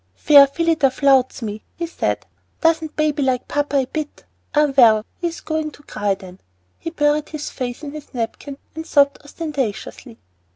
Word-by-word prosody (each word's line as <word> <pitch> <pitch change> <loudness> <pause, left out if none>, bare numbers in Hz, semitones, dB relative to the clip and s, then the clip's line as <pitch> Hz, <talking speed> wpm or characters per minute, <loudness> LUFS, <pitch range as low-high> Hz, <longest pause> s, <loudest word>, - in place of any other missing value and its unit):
"Fair 285 - +7
Phillida 320 -1 +2
flouts 265 -2 +2
me," 215 0 -5
he 340 - -3
said. 335 - -2 0.3
"Doesn't 325 -1 +1
baby 305 -1 +1
like 260 -2 0
papa 290 -1 0
a 265 - +2
bit? 300 +3 -6 0.3
Ah, 295 -2 +3
well, 220 -4 +6
he 345 - 0
is 335 - -6
going 315 -1 -2
to 295 - -17
cry, 205 -6 -1
then." 185 -1 -13 0.4
He - - -4
buried 295 -2 +1
his 305 -1 -5
face 245 +2 -5
in 290 - -5
his 300 0 -10
napkin 250 +3 -5 0.2
and 320 - -6
sobbed 280 -1 +3
ostentatiously. 275 -6 -5
285 Hz, 170 wpm, -20 LUFS, 255-305 Hz, 0.4 s, Fair